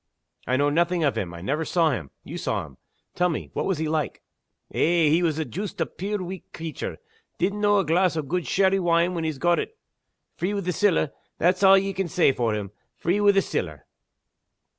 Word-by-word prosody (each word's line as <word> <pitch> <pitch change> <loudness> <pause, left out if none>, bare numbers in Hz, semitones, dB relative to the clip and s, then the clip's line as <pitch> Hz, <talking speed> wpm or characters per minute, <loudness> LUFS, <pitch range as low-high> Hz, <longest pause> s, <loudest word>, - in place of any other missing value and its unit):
"I 130 - +2
know 145 +1 +2
nothing 170 +2 +1
of 140 -6 +2
him; 95 -6 -3
I 85 0 -9
never 145 - -1
saw 165 -1 +2
him. 85 - -4
You - - -7
saw - - -2
him. - - -16 0.4
Tell 180 0 +2
me 165 - -4
what - - -1
was 190 -4 0
he 160 +1 -1
like?" 155 -1 -2 0.5
"Eh! 165 -2 +3
he 160 +4 +3
was 160 -3 +1
joost 200 +5 -5
a - - +2
puir 200 +1 -4
weak 185 0 -8
creature. 160 -1 -5 0.4
Didn't 200 +3 -1
know 205 0 +4
a 195 - +2
glass 170 +2 +2
o' 155 - 0
good 175 +5 -2
sherry 195 0 +3
wine 170 0 +2
when 165 -2 -2
he'd 155 -4 -3
got 175 +2 +3
it. 445 - -5 0.6
Free 195 +4 -1
wi' 200 - -1
the 180 -1 -2
siller 175 -6 +2 0.3
that's 180 +3 +2
a' 195 0 +8
ye 195 0 -2
can 190 -1 -2
say 170 -3 +3
for 115 -4 0
him 100 -2 -5 0.2
free 180 +9 0
wi' 205 0 +6
the 195 -1 +3
siller!" - - -4
170 Hz, 215 wpm, -25 LUFS, 155-190 Hz, 0.6 s, a